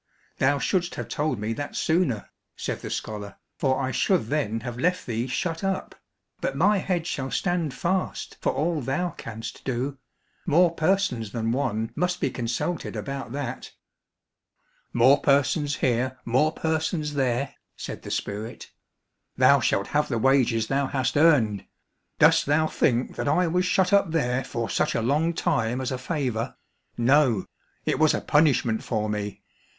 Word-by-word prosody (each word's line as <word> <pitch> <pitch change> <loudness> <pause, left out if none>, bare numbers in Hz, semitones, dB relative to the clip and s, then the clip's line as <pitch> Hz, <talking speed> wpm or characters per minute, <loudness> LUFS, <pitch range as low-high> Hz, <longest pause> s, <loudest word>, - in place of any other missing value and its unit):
"Thou 140 +2 +3
shouldst 175 +4 0
have - - -5
told 150 -5 -1
me 105 +2 -2
that 145 +5 -5
sooner," 160 - 0 0.2
said - - -4
the - - -6
scholar, 105 -2 -5 0.2
"for 130 -2 +1
I 130 -1 -1
should 180 - +2
then 115 -7 -1
have 120 0 -6
left 180 +5 +1
thee 115 +1 -2
shut 165 +6 -2
up, 195 -1 -2 0.5
but 135 - -2
my 200 +6 +4
head 180 -3 -1
shall 135 -6 -3
stand 175 -3 0
fast 185 +2 -2
for - - +1
all 160 +1 -1
thou 160 +8 -1
canst 115 0 -8
do; 130 +2 -2 0.5
more 170 +2 +5
persons 160 - 0
than 115 -1 -1
one 115 -4 -1
must 180 +2 0
be 135 - 0
consulted 120 +8 -3
about 135 -3 -5
that." 140 -4 -5 1.2
"More 130 +4 +5
persons 145 +1 +2
here, 130 +1 0
more 130 +7 +3
persons 160 -1 -1
there," 135 0 0 0.2
said - - -7
the - - -8
spirit. 105 +3 -4 0.7
"Thou - - +6
shalt 100 - 0
have 150 0 +1
the 120 - 0
wages 125 -2 +3
thou 135 +3 0
hast 130 -2 -1
earned. 135 - +3 0.5
Dost - - +5
thou 155 +2 +3
think 125 -5 0
that - - -2
I 180 +5 +3
was 180 +2 +1
shut 185 +1 +2
up 200 -3 +4
there 135 -5 0
for 115 -2 -3
such - - 0
a 115 - +1
long 155 +7 +1
time 115 -2 0
as 130 0 -2
a 130 - -3
favour. 130 -6 -2 0.4
No, 120 -4 +3 0.4
it - - 0
was 155 -1 +4
a - - -2
punishment 140 -7 +2
for 110 -3 -1
me. 105 -1 -4
135 Hz, 160 wpm, -25 LUFS, 120-160 Hz, 1.2 s, Thou